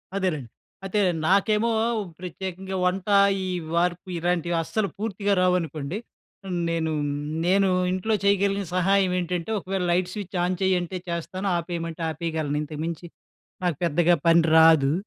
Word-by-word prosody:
అదేలెండి. 155 - -1 0.4
అతె 205 +2 0 0.3
నాకేమో 210 +4 +3 0.5
ప్రత్యేకంగా 190 +1 -6
వంట 185 +2 -1 0.4
ఈ - - -3 0.3
వార్పి 180 +1 0
ఇలాంటివస్సలు 175 +3 0
పూర్తిగా 205 -1 -1
రావనుకోండి. 170 -2 0 0.7
నేను 160 -1 -1 0.5
నేను 195 +1 +3 0.2
ఇంట్లో 185 +4 -1
చేయగలిగిన 200 0 +2
సహాయం 190 0 +3
ఏంటంటే, 175 +2 -3
ఒకవేళ 190 0 -3
లైట్ 180 +1 +1
స్విచ్ 195 -3 -5
ఆన్ 180 0 0
చేయంటే 185 -1 0
చేస్తాను. 185 +3 -3
ఆపేయమంటే 165 -1 -4
ఆపేయగలను. 155 -2 -2
ఇంతకుమించి 160 +3 -5 0.6
నాకు 170 -5 0
పెద్దగా 170 +2 +3
పని 165 0 +6
రాదు. 160 -3 +6
180 Hz, 115 wpm, -25 LUFS, 165-190 Hz, 0.7 s, పని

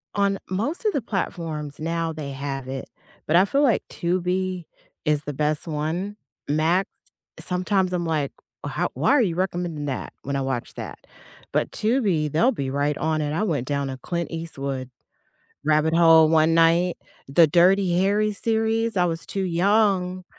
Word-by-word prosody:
on 200 -1 +1
most 255 - -2
of 425 - +2
the 280 - 0
platforms 165 -8 -4
now, 165 +1 -1
they 150 -3 -6
have 135 -1 -5
it, 135 0 -6 0.4
but 155 - +2
I 185 - +6
feel 275 +8 +1
like 240 -7 +3
Tubi 180 0 -1 0.4
is 150 -1 +1
the 145 - -5
best 150 +3 -1
one. 165 +7 -3 0.3
Max, 165 +6 +2 0.5
sometimes 185 0 0
I'm 175 -1 -1
like, 155 -4 -1 0.3
"How - - -1
why - - +2
are 285 - +5
you 180 -7 0
recommending 175 -5 -2
that 135 -2 -4
when 140 0 -3
I 135 - 0
watch 130 -3 -3
that?" - - -7 0.5
but - - 0
Tubi, 205 - +1
they'll 200 - +3
be 140 - -3
right 145 +1 0
on 155 0 0
it. 145 -1 -2
I 170 - 0
went 145 - -1
down 140 -1 -1
a 130 - -5
Clint 170 +5 -3
Eastwood 140 -6 -5 0.8
rabbit 155 +1 +3
hole 165 -2 +7
one 160 0 +4
night, 165 +2 +3 0.3
the 160 +4 +5
Dirty 180 +2 +4
Harry 210 +2 +2
series, 225 0 0
I 180 - +4
was 165 -1 -3
too 195 - -2
young 185 0 +2
170 Hz, 170 wpm, -24 LUFS, 150-190 Hz, 0.8 s, hole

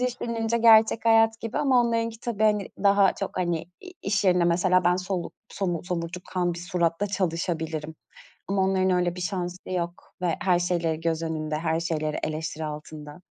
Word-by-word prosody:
düşününce 235 -2 -1
gerçek 225 -1 +5
hayat 225 0 +4
gibi 225 +1 -3
ama 265 -4 +4
onlarınki 230 -1 -1
tabii, 230 -4 -3
hani 210 -2 +2 0.2
daha 200 -1 +5
çok, 195 - -5
hani 175 -3 -1 0.2
i 370 - -10
iş 200 0 0
yerinde 180 -2 +4
mesela 180 +1 +3
ben 180 +1 +4
soluk 185 -1 -3 0.2
somur 175 -4 -3
somurtkan 180 0 -3
bir - - -7
suratla 175 +1 0
çalışabilirim 165 -4 -2 0.5
ama 195 0 +1
onların 190 0 +2
öyle 180 -1 +1
bir 180 - -6
şansı 180 -1 -4
yok 175 -1 -4
ve 175 -3 +1
her 180 -2 +3
şeyleri 170 -3 0
göz 165 -1 -1
önünde, 155 -1 -3
her 160 0 0
şeyleri 155 -2 -2
eleştiri 155 0 -3
altında. 150 +1 -8
180 Hz, 165 wpm, -26 LUFS, 165-205 Hz, 0.5 s, gerçek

